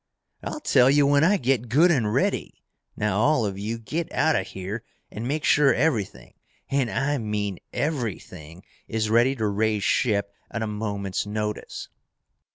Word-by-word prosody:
"I'll 305 - -5
tell 130 - +4
you 145 +1 +4
when 145 +1 +4
I 195 +5 +4
get 125 - 0
good 160 +9 +5
and 115 -9 +1
ready! - - -1 0.3
Now 105 -2 0
all 135 -1 +3
of 100 -1 -4
you, 110 +3 -3
get 155 +9 -4
out 160 - +2
of - - -1
here 95 +4 -6 0.3
and 110 +3 -5
make 150 +3 -2
sure 145 -2 +4
everything, 125 -8 -1 0.4
and 135 -3 +1
I 140 +3 0
mean 105 -4 -3
everything, 100 - -4 0.2
is 110 -1 -1
ready 120 +4 +4
to 110 -4 -2
raise 105 0 0
ship 100 -3 +1 0.2
at 115 - -3
a - - -1
moment's 100 -2 -3
notice!" 105 0 -4
110 Hz, 165 wpm, -25 LUFS, 105-140 Hz, 0.4 s, good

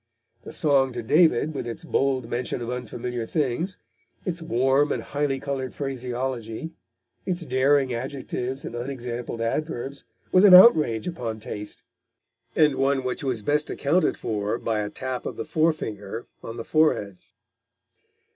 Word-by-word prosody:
The - - -9
Song 135 -4 +2
to 120 -1 -4
David, 155 +2 +3
with 135 - -4
its 120 +8 -6
bold 135 -6 0
mention 120 +2 -2
of 120 0 -4
unfamiliar 125 -1 -4
things, 155 - -1 0.5
its 175 -2 -3
warm 135 0 +2
and - - -2
highly 140 -2 -1
coloured 135 -2 -4
phraseology, 130 0 -4 0.5
its 175 -2 -3
daring 135 0 +3
adjectives 130 +1 -4
and - - -6
unexampled 120 -2 -4
adverbs, 135 +2 -3 0.3
was 185 - +6
an 195 -3 +10
outrage 155 - +7
upon 120 -11 -4
taste, 105 -1 -7 0.7
and 150 -3 +4
one 135 0 +2
which 125 +2 -3
was 125 -6 -1
best 150 +5 +1
accounted 165 +6 +1
for 105 0 -2
by 110 -3 -1
the 105 - -3
tap 130 +2 -4
of - - -6
the - - -4
forefinger 135 -10 -1 0.2
on 115 +1 -7
the 115 - -5
forehead. 130 - +2
130 Hz, 145 wpm, -25 LUFS, 120-150 Hz, 0.7 s, an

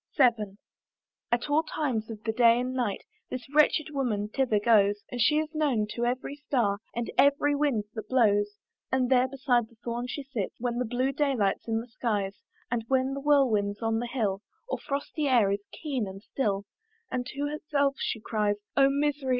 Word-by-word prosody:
VII. 225 -7 +3 0.7
At 240 +3 +1
all 295 +2 +3
times 260 -9 -2
of 220 -1 -8
the 225 - 0
day 235 +1 +5
and 250 +1 -2
night 240 -6 -1 0.3
This 255 -1 -5
wretched 300 0 +4
woman 225 -8 -1
thither 235 -3 +1
goes, 205 -2 +3
And 245 -1 -2
she 300 +7 +4
is 310 +1 -1
known 280 -9 +1
to 240 - -1
every 255 +3 -2
star, 240 -9 0 0.2
And 235 0 -2
every 285 +1 +4
wind 285 -7 +1
that 220 -2 -6
blows; 205 -4 +3 0.3
And 260 -1 +1
there 255 0 +5
beside 250 -4 +1
the 230 - -22
thorn 240 +1 -3
she 285 +3 -5
sits 255 -7 -4
When 240 0 -1
the 250 - 0
blue 250 +3 0
day 280 0 +1
light's 200 -2 0
in 225 0 0
the 235 - -11
skies, 210 -5 -2 0.3
And 235 -2 0
when 265 +1 +1
the 275 - -3
whirlwind's 235 -8 +2
on 225 0 +1
the 240 - -3
hill, 205 -6 -1 0.3
Or - - -3
frosty 285 +2 -2
air 235 -7 +4
is 200 0 -1
keen 270 -9 -3
and 195 +1 -9
still, 205 -7 -1 0.5
And 250 -1 -1
to 275 +2 -6
herself 290 -1 0
she 225 - -2
cries, 210 -1 0 0.2
"Oh 275 0 +6
misery! 285 -1 0
245 Hz, 190 wpm, -28 LUFS, 215-275 Hz, 0.7 s, Oh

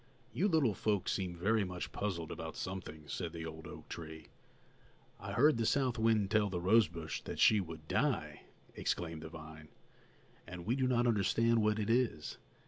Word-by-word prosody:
"You 175 - +2
little 155 - +3
folks 100 0 0
seem 90 -2 -2
very 105 +5 +2
much 90 -1 -5
puzzled 85 -6 -3
about 80 0 -6
something," 85 -5 -6
said 70 - -4
the 80 -1 -5
old 80 0 -8
oak - - -10
tree. 80 -2 -8 0.9
"I - - -6
heard 145 +1 +5
the 115 - 0
south 130 -4 +1
wind 110 -3 +2
tell 105 -2 +3
the 90 -2 -2
rose 105 +5 +5
bush 85 -2 -5
that - - -6
she 110 - +6
would 80 -3 -9
die," - - 0 0.3
exclaimed 80 -2 -2
the 80 - -7
vine, 80 -1 -10 0.8
"and 85 0 -7
we 115 +5 +1
do 130 -1 +1
not 120 -1 +2
understand 115 +1 +3
what 105 0 +2
it 110 +1 0
is. 115 - 0
95 Hz, 180 wpm, -34 LUFS, 80-115 Hz, 0.9 s, she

